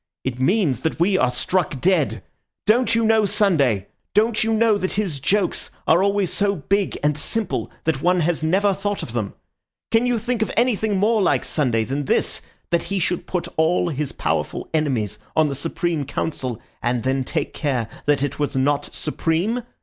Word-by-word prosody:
"It 125 Hz, -1 st, -3 dB
means 155 Hz, -, +2 dB
that 160 Hz, -, -2 dB
we 190 Hz, +3 st, +3 dB
are 130 Hz, -9 st, +3 dB
struck 165 Hz, +4 st, -1 dB
dead! 140 Hz, -, +1 dB, 0.4 s
Don't 230 Hz, +2 st, +3 dB
you 230 Hz, 0 st, +2 dB
know 220 Hz, -1 st, +4 dB
Sunday? 140 Hz, -, +2 dB, 0.3 s
Don't 220 Hz, +1 st, +3 dB
you 225 Hz, -, 0 dB
know 220 Hz, -1 st, +4 dB
that 185 Hz, -, -2 dB
his 190 Hz, -9 st, -1 dB
jokes 190 Hz, +6 st, 0 dB, 0.2 s
are 165 Hz, +3 st, +5 dB
always 200 Hz, -2 st, +1 dB
so 200 Hz, 0 st, +1 dB
big 195 Hz, +5 st, 0 dB
and 150 Hz, 0 st, +2 dB
simple 215 Hz, +8 st, -2 dB
that 155 Hz, -4 st, 0 dB
one 180 Hz, +1 st, +3 dB
has 165 Hz, 0 st, 0 dB
never 195 Hz, +5 st, +2 dB
thought 205 Hz, +1 st, -3 dB
of 115 Hz, -, -7 dB
them? 110 Hz, -4 st, -3 dB, 0.6 s
Can 230 Hz, +2 st, +3 dB
you 245 Hz, -1 st, +2 dB
think 235 Hz, +1 st, -2 dB
of 220 Hz, -, +1 dB
anything 220 Hz, -4 st, +2 dB
more 215 Hz, +3 st, +3 dB
like 185 Hz, -, +2 dB
Sunday 120 Hz, -7 st, +1 dB
than 135 Hz, +5 st, -3 dB
this, -, -, 0 dB, 0.3 s
that 170 Hz, -, +1 dB
he 200 Hz, -, -2 dB
should 180 Hz, -1 st, -1 dB
put 175 Hz, -2 st, -2 dB
all 170 Hz, +2 st, +2 dB
his 150 Hz, -2 st, -3 dB
powerful -, -, -2 dB
enemies 125 Hz, -10 st, 0 dB, 0.2 s
on 155 Hz, -1 st, +4 dB
the -, -, -2 dB
Supreme 165 Hz, +1 st, -2 dB
Council, 130 Hz, -4 st, -3 dB, 0.2 s
and 120 Hz, -1 st, 0 dB
then 130 Hz, 0 st, 0 dB
take -, -, -3 dB
care 130 Hz, -7 st, -1 dB, 0.2 s
that 145 Hz, -2 st, +3 dB
it 145 Hz, -, -3 dB
was 145 Hz, -1 st, -1 dB
not 140 Hz, +2 st, +1 dB
supreme? 170 Hz, +10 st, -1 dB
170 Hz, 185 wpm, -22 LUFS, 140-205 Hz, 0.6 s, are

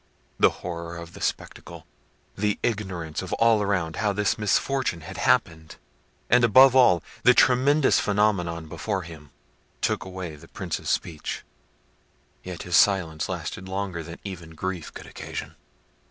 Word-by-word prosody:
The -, -, +6 dB, 0.2 s
horror 85 Hz, -1 st, -5 dB
of 85 Hz, 0 st, -9 dB
the -, -, -11 dB
spectacle, -, -, -5 dB, 0.5 s
the 105 Hz, +1 st, 0 dB
ignorance 95 Hz, -8 st, -2 dB
of 95 Hz, -, -6 dB
all 115 Hz, -2 st, +4 dB
around 90 Hz, -6 st, -1 dB
how 105 Hz, -1 st, +1 dB
this 105 Hz, +1 st, +1 dB
misfortune 110 Hz, -2 st, 0 dB
had 80 Hz, -, -9 dB
happened, 80 Hz, -1 st, +1 dB, 0.5 s
and 120 Hz, +1 st, +4 dB
above 130 Hz, +3 st, +7 dB
all, 90 Hz, -11 st, +5 dB, 0.2 s
the 125 Hz, -, +6 dB
tremendous 135 Hz, +4 st, +4 dB
phenomenon 100 Hz, -6 st, 0 dB
before 95 Hz, +5 st, -3 dB
him, 80 Hz, -3 st, -12 dB, 0.5 s
took -, -, 0 dB
away 90 Hz, -4 st, -7 dB
the 75 Hz, -, -15 dB
Prince's -, -, -5 dB
speech. 80 Hz, -3 st, -3 dB, 1.0 s
Yet 90 Hz, -2 st, -7 dB
his 90 Hz, -2 st, -1 dB
silence 85 Hz, -6 st, +2 dB
lasted 95 Hz, +1 st, -5 dB
longer 95 Hz, -3 st, -3 dB
than 85 Hz, +1 st, -9 dB
even 85 Hz, -5 st, -8 dB
grief 90 Hz, 0 st, -4 dB
could -, -, -10 dB
occasion. -, -, -7 dB
95 Hz, 140 wpm, -25 LUFS, 85-105 Hz, 1.0 s, above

